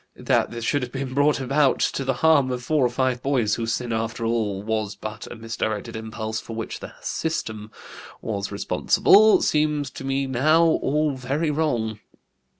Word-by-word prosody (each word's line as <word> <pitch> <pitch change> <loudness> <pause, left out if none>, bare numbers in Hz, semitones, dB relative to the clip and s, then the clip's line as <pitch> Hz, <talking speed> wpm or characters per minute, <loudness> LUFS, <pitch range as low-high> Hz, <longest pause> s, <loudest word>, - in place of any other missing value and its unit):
That - - +1
this 115 -1 -6
should 145 +3 +1
have 125 -1 -5
been 135 -1 -4
brought 145 +2 +3
about 135 +1 +2
to 135 - 0
the 135 0 0
harm 145 -5 +5
of 125 -1 -3
four 150 +2 +1
or 125 - +3
five 125 0 -1
boys 125 -7 +1
whose 115 -1 -1
sin, 120 -2 -3
after 115 +1 -2
all, 110 -4 -1
was 110 -1 -2
but 110 0 -7
a - - -6
misdirected 110 -2 -4
impulse 110 0 -4
for 115 - -8
which 115 - -5
the - - -9
system 110 -10 -3 0.5
was 100 -3 -4
responsible, 205 - +4
seems 150 -2 +1
to - - -9
me 135 0 -1
now 150 +6 +3
all 150 -2 +1
very 140 +5 -1
wrong. 120 -9 -1
125 Hz, 175 wpm, -24 LUFS, 110-145 Hz, 0.5 s, harm